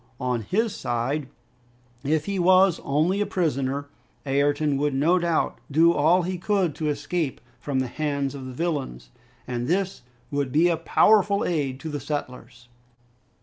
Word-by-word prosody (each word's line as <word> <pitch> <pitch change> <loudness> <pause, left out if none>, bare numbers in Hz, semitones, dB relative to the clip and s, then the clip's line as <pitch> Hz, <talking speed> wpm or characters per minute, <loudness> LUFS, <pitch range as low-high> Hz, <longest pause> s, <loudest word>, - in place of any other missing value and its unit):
On 125 -2 -1
his 210 - -1
side, 130 +4 -2 0.7
if 150 +2 0
he 200 -1 -2
was 185 0 +4
only 160 +8 +1
a - - +2
prisoner, 140 -5 -1 0.4
Ayrton 145 +1 +1
would 145 0 0
no 165 +7 +3
doubt 170 -2 0
do 165 +4 +4
all 170 +4 +3
he 180 0 -3
could 190 -4 +1
to 155 -1 -1
escape 145 +1 -2 0.2
from 135 +1 -2
the 130 - -2
hands 140 0 -2
of 135 -2 -7
the - - -6
villains, 130 - -3 0.4
and 120 -1 -3
this 190 +3 -1 0.3
would 140 -2 -1
be 160 +5 +4
a 170 - +2
powerful 200 +4 +3
aid 140 -6 -1
to 160 - -5
the 145 -1 -4
settlers! 125 -4 -6
150 Hz, 155 wpm, -25 LUFS, 135-175 Hz, 0.7 s, was